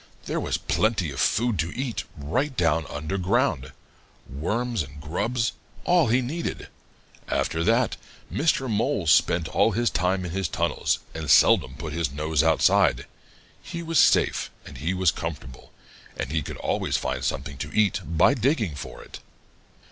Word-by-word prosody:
There -, -, -2 dB
was -, -, -1 dB
plenty 105 Hz, -8 st, 0 dB
of -, -, -7 dB
food 115 Hz, -4 st, +1 dB
to 85 Hz, +2 st, -1 dB
eat 130 Hz, -3 st, -3 dB
right 130 Hz, -, -2 dB
down 80 Hz, -2 st, +1 dB
under 75 Hz, +6 st, -3 dB
ground 95 Hz, -, 0 dB, 0.6 s
worms 110 Hz, -, -2 dB
and 70 Hz, 0 st, -8 dB
grubs 115 Hz, -, -1 dB, 0.3 s
all 175 Hz, -4 st, +3 dB
he 120 Hz, +3 st, +3 dB
needed. 160 Hz, +7 st, -4 dB, 0.6 s
After 80 Hz, 0 st, -1 dB
that, 115 Hz, +3 st, +2 dB, 0.4 s
Mr. 145 Hz, -4 st, +1 dB
Mole 110 Hz, -2 st, 0 dB
spent 80 Hz, +1 st, +3 dB
all 115 Hz, -, +2 dB
his 120 Hz, +3 st, +1 dB
time 90 Hz, +1 st, 0 dB
in 85 Hz, -, -5 dB
his 95 Hz, 0 st, -1 dB
tunnels 85 Hz, +1 st, 0 dB, 0.2 s
and 80 Hz, -2 st, -5 dB
seldom 65 Hz, -, +5 dB
put 75 Hz, +2 st, -6 dB
his 80 Hz, -4 st, -1 dB
nose 75 Hz, +1 st, 0 dB
outside. 80 Hz, -1 st, +3 dB, 0.6 s
He 170 Hz, 0 st, -6 dB
was 165 Hz, -1 st, +1 dB
safe, -, -, +3 dB, 0.2 s
and -, -, -10 dB
he 85 Hz, +6 st, -1 dB
was 90 Hz, -3 st, +3 dB
comfortable, 70 Hz, -7 st, -7 dB, 0.5 s
and 65 Hz, -, -4 dB
he 80 Hz, 0 st, 0 dB
could -, -, -7 dB
always -, -, -1 dB
find -, -, -3 dB
something 70 Hz, 0 st, -3 dB
to 75 Hz, +2 st, -5 dB
eat 105 Hz, -3 st, +2 dB
by 80 Hz, -, +3 dB
digging 120 Hz, -, 0 dB
for 70 Hz, -, -8 dB
it. -, -, -11 dB
90 Hz, 160 wpm, -25 LUFS, 75-120 Hz, 0.6 s, seldom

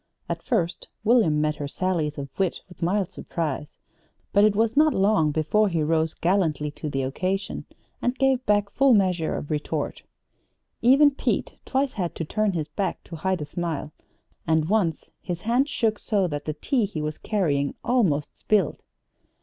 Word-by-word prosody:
At -, -, -3 dB
first 175 Hz, -, -1 dB, 0.2 s
William 210 Hz, -10 st, +4 dB
met 150 Hz, 0 st, 0 dB
her 145 Hz, -, -4 dB
sallies 160 Hz, -2 st, -1 dB
of 140 Hz, -1 st, -5 dB
wit 190 Hz, -2 st, 0 dB
with 180 Hz, -, -16 dB
mild 185 Hz, +2 st, 0 dB
surprise; 150 Hz, -2 st, -4 dB, 0.6 s
but 205 Hz, -, +5 dB
it 210 Hz, -1 st, +4 dB
was 225 Hz, +2 st, +2 dB
not 305 Hz, +1 st, +4 dB
long 195 Hz, -5 st, +3 dB
before 160 Hz, +8 st, +2 dB
he 165 Hz, -3 st, 0 dB
rose 160 Hz, +1 st, +1 dB
gallantly 160 Hz, -5 st, +1 dB
to 150 Hz, +1 st, -6 dB
the 135 Hz, -1 st, -1 dB
occasion, 185 Hz, +9 st, -2 dB, 0.4 s
and 245 Hz, +1 st, 0 dB
gave 265 Hz, -1 st, +2 dB
back 205 Hz, -1 st, +2 dB
full 270 Hz, 0 st, +5 dB
measure 180 Hz, -5 st, +1 dB
of 145 Hz, -, -5 dB
retort. 150 Hz, -1 st, -2 dB, 0.8 s
Even 275 Hz, +5 st, +6 dB
Pete 275 Hz, -, -1 dB
twice 270 Hz, 0 st, 0 dB
had 180 Hz, -4 st, -3 dB
to 165 Hz, -, -3 dB
turn 215 Hz, +4 st, 0 dB
his 155 Hz, -3 st, -2 dB
back 185 Hz, +3 st, -3 dB
to 165 Hz, -, -9 dB
hide 185 Hz, +1 st, -1 dB
a -, -, -5 dB
smile, 160 Hz, -2 st, -4 dB, 0.6 s
and 160 Hz, 0 st, +2 dB
once 195 Hz, -7 st, 0 dB
his 175 Hz, -1 st, -4 dB
hand 245 Hz, +6 st, +2 dB
shook 220 Hz, -6 st, 0 dB
so 200 Hz, -3 st, +1 dB
that 145 Hz, -4 st, -4 dB
the 155 Hz, -, -2 dB
tea 235 Hz, -, 0 dB
he 195 Hz, -5 st, -5 dB
was 155 Hz, 0 st, -4 dB
carrying 145 Hz, -10 st, 0 dB
almost 185 Hz, -, +1 dB
spilled. 200 Hz, -8 st, +1 dB
185 Hz, 175 wpm, -25 LUFS, 155-215 Hz, 0.8 s, Even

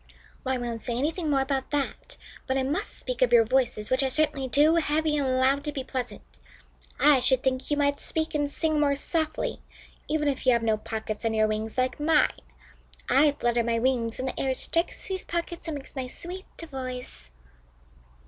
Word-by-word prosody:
"Well, 260 Hz, 0 st, 0 dB
I -, -, -1 dB
won't 235 Hz, -2 st, -4 dB
say 235 Hz, -2 st, -3 dB
anything 315 Hz, +4 st, -1 dB
more 275 Hz, -2 st, +3 dB
about 270 Hz, 0 st, -1 dB
that, 290 Hz, -, -3 dB, 0.3 s
but 265 Hz, 0 st, +1 dB
I 265 Hz, -, +1 dB
must 300 Hz, +10 st, -2 dB
speak -, -, -5 dB
of -, -, +4 dB
your 470 Hz, -1 st, +7 dB
voices, 250 Hz, -5 st, 0 dB
which 260 Hz, +2 st, +3 dB
are 270 Hz, -, +1 dB
certainly 285 Hz, -2 st, +1 dB
too 300 Hz, +5 st, +4 dB
heavy 310 Hz, -1 st, +1 dB
and 265 Hz, -3 st, +1 dB
loud 270 Hz, +2 st, +3 dB
to 295 Hz, -, -1 dB
be 275 Hz, -2 st, -4 dB
pleasant. 255 Hz, -1 st, -6 dB, 0.6 s
I 295 Hz, -2 st, +6 dB
should 255 Hz, 0 st, +4 dB
think 260 Hz, -1 st, 0 dB
you 295 Hz, -, +1 dB
might 285 Hz, -1 st, +1 dB
speak 315 Hz, 0 st, -2 dB
and 290 Hz, -1 st, 0 dB
sing 310 Hz, +1 st, 0 dB
more 285 Hz, -1 st, +3 dB
softly, 315 Hz, +2 st, -2 dB, 0.5 s
even 300 Hz, -1 st, 0 dB
if 270 Hz, -2 st, -1 dB
you 255 Hz, -, +7 dB
have 235 Hz, -1 st, +1 dB
no 220 Hz, -1 st, +3 dB
pockets 215 Hz, 0 st, -5 dB
under 225 Hz, -1 st, 0 dB
your 215 Hz, 0 st, +4 dB
wings 215 Hz, +2 st, -3 dB
like 255 Hz, +2 st, 0 dB
mine. 300 Hz, 0 st, +3 dB, 0.8 s
I 280 Hz, +3 st, +5 dB
flutter 240 Hz, -3 st, +1 dB
my 230 Hz, 0 st, 0 dB
wings, 230 Hz, -2 st, 0 dB
and 260 Hz, -, -3 dB
the -, -, -4 dB
air 265 Hz, -1 st, 0 dB
strikes 335 Hz, +6 st, -1 dB
these 380 Hz, -2 st, -3 dB
pockets 340 Hz, 0 st, -4 dB
and 310 Hz, -3 st, -2 dB
makes 275 Hz, -, -12 dB
my 260 Hz, -2 st, -3 dB
sweet 360 Hz, +8 st, -8 dB
voice." 255 Hz, -, -7 dB
270 Hz, 200 wpm, -27 LUFS, 255-305 Hz, 0.8 s, your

